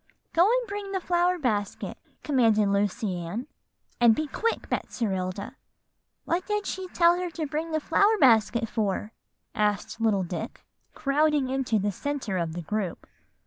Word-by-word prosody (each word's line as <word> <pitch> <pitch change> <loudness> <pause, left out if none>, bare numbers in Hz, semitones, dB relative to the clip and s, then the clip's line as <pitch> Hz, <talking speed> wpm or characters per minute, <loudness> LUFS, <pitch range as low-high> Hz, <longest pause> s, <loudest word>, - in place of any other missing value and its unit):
'Go 335 - +4
and - - +1
bring 405 -1 -5
the 380 - 0
flower 355 0 +1
basket,' 210 - -2 0.2
commanded 225 -8 +3
Lucy 200 -1 0
Ann, 175 +9 -4 0.5
'and 235 -2 +6
be 310 - -1
quick, 455 - -2
Betserilda.'" 200 +2 -3 0.7
"What 355 +2 -1
did 420 -1 -1
she 375 0 -4
tell 345 0 +4
her 360 -1 -2
to 325 -1 -4
bring 310 +3 -3
the 315 - +1
flower 405 +8 +3
basket 230 -2 +4
for?" 210 -1 -2 0.4
asked 210 +1 -1
little 210 -4 +2
Dick, 180 +6 -6 0.3
crowding 295 -1 +2
into 260 -4 0
the 205 0 0
centre 235 -3 -3
of 165 -2 -2
the 175 +1 -5
group. 210 0 -3
245 Hz, 150 wpm, -27 LUFS, 205-335 Hz, 0.7 s, and